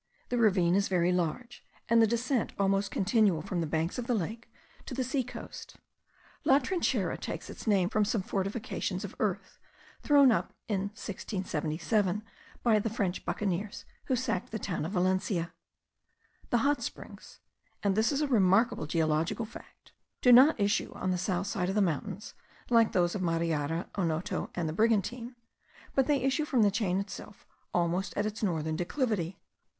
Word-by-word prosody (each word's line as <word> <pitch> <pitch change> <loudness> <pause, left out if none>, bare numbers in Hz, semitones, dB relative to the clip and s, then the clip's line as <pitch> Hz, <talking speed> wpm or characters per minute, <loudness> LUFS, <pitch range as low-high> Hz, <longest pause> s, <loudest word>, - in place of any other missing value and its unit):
The 245 - 0
ravine 185 -6 +4
is 200 +1 +2
very 180 -1 +2
large, 180 +8 -2 0.2
and 230 0 +5
the 225 - +6
descent 235 +2 0
almost 195 0 +1
continual 195 -5 +2
from 185 -2 -2
the 165 - -1
banks 160 +7 -1
of 240 - -4
the 245 - +2
lake 220 +4 -4 0.4
to 255 - -5
the 260 - 0
sea 260 +1 0
coast. 250 - -9 0.7
La 270 - +6
Trinchera 340 +6 0
takes - - -5
its - - -10
name 195 -4 +3
from 215 +2 +1
some 210 -1 0
fortifications 195 +4 -3
of - - -9
earth, - - -2 0.4
thrown 280 -3 +6
up 220 - -1
in 200 -2 -1
1677 185 +1 -2 0.4
by 225 -3 +4
the 225 - -1
French 200 -5 -2
buccaneers, 200 0 -2 0.2
who 260 - +1
sacked 230 -6 -2
the 220 - -2
town 180 -7 -3
of 180 - -4
Valencia. 185 -2 0 1.0
The 240 +2 +2
hot 290 0 +2
springs - - -8 0.4
(and 200 -1 +3
this 220 +5 +2
is 285 +1 0
a 300 - +1
remarkable 205 - +3
geological 160 +6 0
fact,) 220 - -14 0.3
do 250 - +7
not 265 +3 +7
issue 200 0 +1
on 185 - -1
the 180 - 0
south 185 0 -1
side 195 -3 -1
of 195 - -2
the - - +3
mountains, 185 +2 -2 0.4
like 230 -2 +5
those 175 -1 +2
of 205 - -3
Mariara, 165 -1 -1
Onoto, 165 -3 -2
and 175 -3 -1
the 155 - -3
Brigantine; 230 +4 0 0.6
but 270 -2 +2
they 285 -3 +2
issue 270 +3 +1
from 255 -7 +2
the 205 - +4
chain 195 -3 0
itself 200 +1 -8 0.3
almost 175 +2 0
at 205 - +1
its 215 +1 -4
northern 160 -6 -1
declivity. 195 - -1
200 Hz, 170 wpm, -30 LUFS, 180-230 Hz, 1.0 s, do